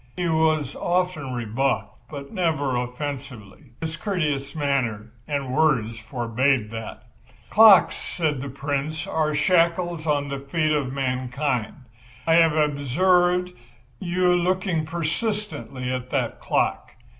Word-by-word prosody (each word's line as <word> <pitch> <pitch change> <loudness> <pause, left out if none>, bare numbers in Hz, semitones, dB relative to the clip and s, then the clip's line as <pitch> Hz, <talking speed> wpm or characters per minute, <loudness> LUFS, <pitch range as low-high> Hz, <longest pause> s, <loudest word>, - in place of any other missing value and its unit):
He 180 -1 0
was 155 -3 +1
often 175 -7 -1
rebuffed 115 -2 -1 0.2
but 140 -2 -8
never 155 - 0
offensively. 125 -2 -5 0.2
His 160 0 -4
courteous 150 -8 -2
manner 125 -7 -1 0.2
and 140 -4 -2
words 125 -7 +1
forbade 120 0 0
that. 115 -1 -7 0.5
"Clocks," 215 -4 +7
said 150 -6 -2
the 140 - -5
Prince, 140 +3 -3
"are 155 -1 0
shackles 170 0 +1
on 145 -1 +1
the 140 -1 -4
feet 155 +3 -1
of 145 -4 0
mankind. 130 -2 -2 0.5
I 165 - +3
have 165 -1 +5
observed 175 +5 +2 0.5
you 180 0 +2
looking 180 -2 0
persistently 165 - -3
at 125 0 -4
that 130 -4 -1
clock. - - -1
145 Hz, 120 wpm, -24 LUFS, 130-165 Hz, 0.5 s, Clocks